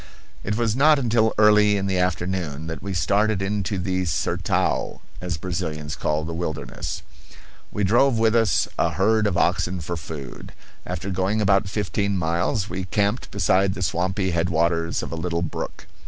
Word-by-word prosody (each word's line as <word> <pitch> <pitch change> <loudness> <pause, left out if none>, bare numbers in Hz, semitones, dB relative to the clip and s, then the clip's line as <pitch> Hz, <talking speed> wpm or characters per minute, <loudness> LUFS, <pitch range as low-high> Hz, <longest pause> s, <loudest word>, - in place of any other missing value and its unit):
It 105 +2 -2
was 115 -2 +1
not 150 +3 +5
until 115 -4 +2
early 105 -1 +5
in 95 - -1
the 95 -2 0
afternoon 90 -4 -1
that 80 -3 -5
we 100 - -5
started 100 +5 +2
into 100 0 -2
the 95 0 -1
"sertao,"[*] 80 -2 -1 0.2
as 90 -3 -3
Brazilians 80 -4 -4
call 75 0 -1
the 85 - -5
wilderness. 80 -2 -4 0.7
We 105 - -2
drove 120 +5 +4
with 110 0 +3
us 115 -7 +3
a 85 - +2
herd 105 +5 +2
of 85 - -1
oxen 90 +1 +1
for 85 +2 -4
food. 75 -5 -8 0.3
After 90 +2 -4
going 95 +3 0
about 100 -1 +2
fifteen 100 -1 -1
miles 85 +4 0
we 90 +1 -4
camped 100 +5 0
beside 95 0 +2
the 95 - -3
swampy 95 +2 0
headwaters 85 0 0
of - - -6
a - - -3
little 85 0 -2
brook. 85 - -5
95 Hz, 165 wpm, -23 LUFS, 85-105 Hz, 0.7 s, not